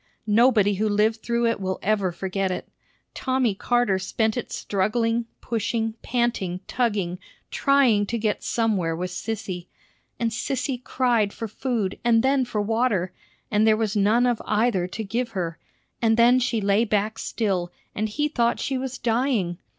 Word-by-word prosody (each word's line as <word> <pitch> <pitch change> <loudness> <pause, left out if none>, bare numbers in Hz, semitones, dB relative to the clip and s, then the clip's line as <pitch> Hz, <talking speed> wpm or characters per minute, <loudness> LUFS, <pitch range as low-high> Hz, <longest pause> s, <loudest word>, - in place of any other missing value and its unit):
Nobody 215 -2 +4
who 215 +2 0
lived 215 +2 +2
through 235 0 0
it 230 -2 +1
will 190 0 -2
ever 200 -2 +1
forget 190 +2 -2
it. 185 - -4 0.5
Tommy 255 -4 0
Carter 215 -1 +1
spent 220 +3 0
it 245 - -4
struggling, 230 +4 0 0.2
pushing, 225 -1 -1
panting, 235 -7 -1
tugging, 200 -8 -1 0.3
trying 255 -8 +3
to 235 - -1
get 215 -2 -1
somewhere 200 -8 0
with 180 +2 -4
Sissy. 190 -3 -5 0.5
And 230 -2 0
Sissy 255 +1 -2
cried 235 -7 +1
for 225 - -5
food 220 -3 -2
and 230 -1 +4
then 265 -1 +3
for 215 -3 -2
water, 215 -5 0 0.4
and 215 +1 +3
there 215 -1 +5
was 220 -1 -1
none 215 +4 +3
of 245 -2 +1
either 210 -4 +1
to 215 +4 -5
give 230 +4 -2
her; 170 -4 -3 0.4
and 225 -1 +3
then 240 +2 +6
she 235 -3 0
lay 200 +2 +3
back 215 0 0
still, 185 -6 -1 0.2
and 215 +1 -2
he 295 +8 0
thought 235 -5 +1
she 265 -1 -1
was 260 0 -4
dying. 225 -7 0
220 Hz, 160 wpm, -24 LUFS, 200-240 Hz, 0.5 s, then